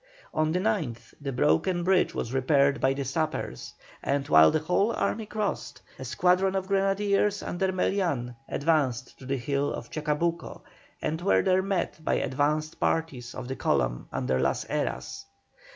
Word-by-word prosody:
On 155 0 +1
the 175 - +1
9th 165 - -2
the 140 -1 -3
broken 135 - +2
bridge 185 +1 +2
was 120 - -3
repaired 140 +1 +3
by 135 +1 +3
the 140 0 -3
sappers, 155 +4 -3 0.3
and 140 0 -1
while 80 0 +8
the - - +2
whole 180 +8 +1
army 220 -2 -1
crossed, 205 - -3 0.2
a 130 - -6
squadron 180 +9 +2
of 190 -1 -1
grenadiers 200 +1 +1
under 190 +2 -1
Melian 170 -10 -1
advanced 140 -6 0
to 130 - -10
the 135 0 0
hill 140 +3 -1
of 115 - -7
Chacabuco, 155 +2 -2 0.4
and 160 +2 -1
were 195 - +3
there 185 -1 +3
met 190 -4 -2
by - - +1
advanced 150 +3 0
parties 135 -7 -1
of 125 - -6
the 130 - -3
column - - 0
under 65 +1 0
Las 65 0 0
Heras. - - -3
155 Hz, 160 wpm, -27 LUFS, 130-185 Hz, 0.4 s, while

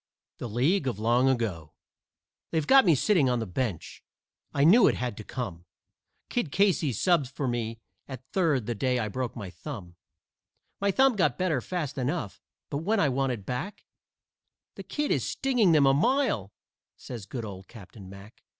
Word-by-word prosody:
THE 120 - -5
LEAGUE 135 - +1
OF 120 - -5
LONG 120 +4 +3
AGO 105 - -2 0.8
They've 160 -2 -1
got 270 - +6
me 170 -4 +5
sitting 155 -2 +3
on 125 - +1
the 115 - -2
bench 100 -1 -4 0.5
I 140 - +1
knew 200 +11 +7
it - - +2
had 125 -3 -3
to 110 - -7
come 95 -9 -6 0.6
Kid 210 - -2
Casey 190 -6 +2
subbed 155 - +2
for 135 +1 -4
me 115 -2 -2 0.3
at 130 -2 -9
third 155 - +1
the 120 - -2
day 125 +3 0
I 110 -3 -1
broke 125 +3 -4
my 100 -6 -7
thumb; 90 - -9 0.8
My 200 - +1
thumb 265 +5 +4
got 195 - +1
better 175 -8 0
fast 150 -5 -4
enough, 130 - -3 0.3
but 140 - -1
when 200 +8 0
I 150 - +3
wanted 130 -6 -1
back, 150 - -5 0.9
"The - - -9
Kid 295 -1 -3
is - - +1
stinging 245 -9 +2
them 150 -3 +5
a 135 - +5
mile," 170 - +1 0.5
says 115 -5 -8
good 120 +1 -5
old 95 -2 -9
Captain 100 -3 -13
Mack. 100 +3 -13
130 Hz, 175 wpm, -27 LUFS, 110-170 Hz, 0.9 s, knew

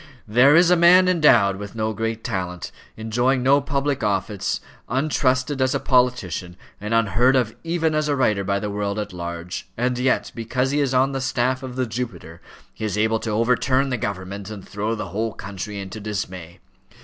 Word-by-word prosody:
There 125 +7 +5
is 175 +1 +5
a - - +7
man 180 +2 +6
endowed 120 - +4
with 100 +2 -8
no 110 0 -1
great 115 +1 -3
talent, 90 -6 -4 0.3
enjoying 120 +4 0
no 140 +2 +4
public 140 0 -1
confidence, 100 -1 -1 0.3
untrusted 130 0 0
as 130 0 +2
a - - +1
politician, 100 - 0 0.2
and 105 +1 -5
unheard 115 +3 +3
of 120 -4 +1
even 165 -1 0
as 155 0 0
a 145 - +1
writer 105 -7 +1
by 100 +1 0
the 105 0 -4
world 100 0 -2
at 105 -2 -4
large, 85 0 -6
and 125 +1 0
yet, 130 +1 +1
because 125 +3 -1
he 145 - +1
is 135 -3 0
on 130 +2 +3
the 135 -1 -3
staff 130 0 0
of 130 -2 -7
the 130 0 0
Jupiter, 105 -9 -6 0.3
he - - -9
is 105 -2 -2
able 110 +1 +2
to 110 - -4
overturn 125 +5 +1
the 125 - -1
government 100 -1 -5
and 105 -3 -9
throw 105 +3 -2
the 105 -4 -5
whole 110 +4 -2
country 100 +1 -6
into 95 +2 -7
dismay. 95 -5 -5
115 Hz, 190 wpm, -22 LUFS, 100-130 Hz, 0.3 s, a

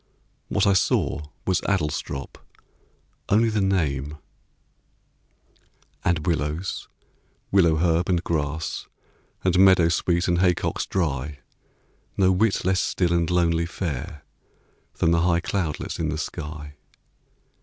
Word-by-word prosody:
What - - +1
I 100 - +4
saw 80 -4 +1 0.2
Was 95 - +1
Adlestrop 75 -7 -2 0.9
only 115 +3 +4
the 105 -2 0
name 75 -7 0 1.9
And 85 -3 0
willows, 80 +2 -2 0.6
willow 85 -5 +4
herb, 85 +2 +1
and 90 -2 +1
grass, 80 -1 -2 0.6
And 90 -1 +2
meadowsweet, 85 -2 +4
and 90 -1 +2
haycocks 90 -2 +1
dry, 75 -5 -2 0.8
No 95 -1 +4
whit 95 +1 +1
less 95 0 +2
still 90 -2 0
and 85 -1 +1
lonely 85 -1 +2
fair 75 -5 -5 0.7
Than 80 - +2
the 85 0 +3
high 85 0 +3
cloudlets 90 -3 -3
in 80 -2 -1
the 75 - -2
sky. 75 -1 -6
85 Hz, 110 wpm, -24 LUFS, 75-95 Hz, 1.9 s, I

